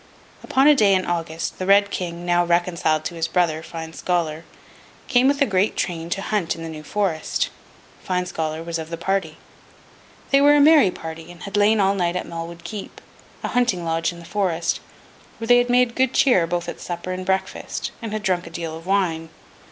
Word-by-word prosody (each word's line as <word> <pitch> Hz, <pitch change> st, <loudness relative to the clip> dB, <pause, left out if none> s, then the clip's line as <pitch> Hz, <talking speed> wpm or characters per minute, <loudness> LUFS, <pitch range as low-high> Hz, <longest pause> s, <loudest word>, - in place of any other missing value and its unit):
Upon 270 Hz, +2 st, +3 dB
a 300 Hz, -, +8 dB
day 210 Hz, -8 st, +4 dB
in 185 Hz, -, 0 dB
August, 165 Hz, -1 st, -3 dB
the 185 Hz, -, -3 dB
Red 200 Hz, +1 st, +5 dB
King, 175 Hz, -1 st, -4 dB
now 175 Hz, 0 st, +3 dB
reconciled 170 Hz, -2 st, +1 dB
to -, -, -3 dB
his 165 Hz, -1 st, -2 dB
brother, 165 Hz, -3 st, +1 dB
Fine 160 Hz, 0 st, -8 dB
Scholar, 165 Hz, -2 st, -2 dB, 0.6 s
came 255 Hz, 0 st, +4 dB
with 280 Hz, +1 st, +3 dB
a -, -, +3 dB
great 190 Hz, -2 st, +1 dB
train 165 Hz, -2 st, -3 dB
to 195 Hz, +3 st, -2 dB
hunt 200 Hz, -7 st, -1 dB
in 165 Hz, -, -8 dB
the 165 Hz, -, -5 dB
New 155 Hz, -1 st, -7 dB
Forest. 165 Hz, 0 st, -1 dB, 0.5 s
Fine 180 Hz, -1 st, -1 dB
Scholar 160 Hz, -2 st, -3 dB
was 170 Hz, 0 st, -3 dB
of 160 Hz, 0 st, -6 dB
the 165 Hz, -, -4 dB
party. 185 Hz, -2 st, -1 dB, 0.9 s
They 275 Hz, 0 st, +5 dB
were 290 Hz, +1 st, +6 dB
a -, -, +5 dB
merry 295 Hz, -7 st, +7 dB
party, 160 Hz, -1 st, -8 dB
and 175 Hz, -, -13 dB
had 200 Hz, -, -6 dB
lain 210 Hz, +1 st, +4 dB
all 195 Hz, 0 st, +3 dB
night 175 Hz, -3 st, 0 dB
at 180 Hz, -, -2 dB
Malwood 170 Hz, 0 st, -7 dB
Keep, 200 Hz, +3 st, -7 dB, 0.4 s
a -, -, -2 dB
hunting 235 Hz, -9 st, +1 dB
lodge 165 Hz, 0 st, 0 dB
in 175 Hz, -, -11 dB
the 170 Hz, -, -11 dB
forest, 175 Hz, -4 st, -1 dB, 0.6 s
where 225 Hz, -, -6 dB
they 245 Hz, +1 st, +7 dB
had 245 Hz, 0 st, 0 dB
made 245 Hz, -1 st, +3 dB
good 260 Hz, 0 st, +1 dB
cheer, 190 Hz, -, +4 dB
both 175 Hz, 0 st, -2 dB
at -, -, -6 dB
supper 175 Hz, +1 st, -5 dB
and 185 Hz, 0 st, -4 dB
breakfast, 190 Hz, +1 st, -2 dB
and 225 Hz, -2 st, -5 dB
had 215 Hz, 0 st, -3 dB
drunk 180 Hz, -3 st, 0 dB
a -, -, -8 dB
deal 165 Hz, -1 st, -5 dB
of 165 Hz, +2 st, -11 dB
wine. 170 Hz, -5 st, 0 dB
175 Hz, 210 wpm, -22 LUFS, 165-205 Hz, 0.9 s, a